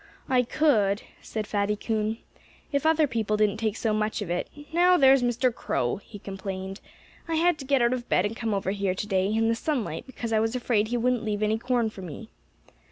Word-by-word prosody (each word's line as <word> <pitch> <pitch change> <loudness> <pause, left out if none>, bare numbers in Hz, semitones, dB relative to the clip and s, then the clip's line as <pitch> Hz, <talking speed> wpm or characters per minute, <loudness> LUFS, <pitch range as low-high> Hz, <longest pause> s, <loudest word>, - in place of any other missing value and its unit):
"I 255 -1 +4
could," 230 -7 +2 0.2
said 215 -1 -4
Fatty 205 0 0
Coon, 220 +1 -1 0.5
"if 280 +1 +1
other 320 -1 +4
people 220 -5 -1
didn't 210 -1 +2
take 220 -1 -1
so 220 -2 0
much 215 0 0
of 175 - -5
it.... 175 - -2 0.2
Now, 360 +2 +5
there's 270 -2 +6
Mr. 245 +1 +1
Crow," 120 - -1
he 205 +2 -12
complained. 195 0 -6 0.5
"I 330 - -1
had 340 0 +3
to 270 - -7
get 270 -2 +3
out 235 +1 +3
of 250 -1 -5
bed 185 - +3
and 210 +2 -2
come 225 -3 -1
over 195 -1 -1
here 195 -2 -1
to 205 - -4
day, 190 -2 +1
in 225 +1 +2
the 230 - +3
sunlight, 230 - -2
because 235 -3 -5
I 220 - +4
was 225 +2 0
afraid 230 -4 +1
he 240 +2 -1
wouldn't 245 0 +1
leave 210 -1 -1
any 215 +1 +1
corn 240 -2 0
for 195 - -10
me. 185 +6 -8
220 Hz, 220 wpm, -26 LUFS, 205-250 Hz, 0.5 s, there's